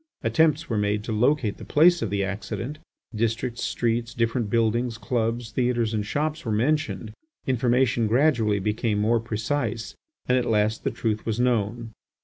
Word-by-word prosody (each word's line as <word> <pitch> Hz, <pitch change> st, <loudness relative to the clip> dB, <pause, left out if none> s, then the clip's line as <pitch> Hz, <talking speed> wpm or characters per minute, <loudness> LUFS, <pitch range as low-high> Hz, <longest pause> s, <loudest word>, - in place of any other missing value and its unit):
Attempts 160 Hz, -3 st, +2 dB
were 110 Hz, -3 st, -1 dB
made 105 Hz, 0 st, 0 dB
to 115 Hz, -, -5 dB
locate 115 Hz, -1 st, +1 dB
the -, -, -10 dB
place 170 Hz, +2 st, +4 dB
of 110 Hz, -, -1 dB
the 100 Hz, 0 st, 0 dB
accident; 105 Hz, +9 st, -4 dB, 0.3 s
districts, 115 Hz, +2 st, -1 dB
streets, 115 Hz, +1 st, -1 dB
different 115 Hz, -1 st, 0 dB
buildings, 115 Hz, +1 st, +1 dB
clubs, 115 Hz, 0 st, -2 dB
theatres, 120 Hz, -1 st, 0 dB
and 105 Hz, -1 st, 0 dB
shops 150 Hz, +7 st, -2 dB
were 115 Hz, -, -3 dB
mentioned. 110 Hz, -3 st, 0 dB, 0.3 s
Information 125 Hz, -2 st, +2 dB
gradually 115 Hz, -4 st, +3 dB
became 105 Hz, +2 st, -1 dB
more 110 Hz, +3 st, +2 dB
precise 115 Hz, 0 st, -3 dB, 0.3 s
and 125 Hz, 0 st, +3 dB
at 125 Hz, -, -2 dB
last 110 Hz, -1 st, +1 dB
the -, -, +1 dB
truth 110 Hz, -3 st, -2 dB
was 110 Hz, 0 st, -1 dB
known. 115 Hz, -1 st, 0 dB
115 Hz, 155 wpm, -25 LUFS, 110-125 Hz, 0.3 s, place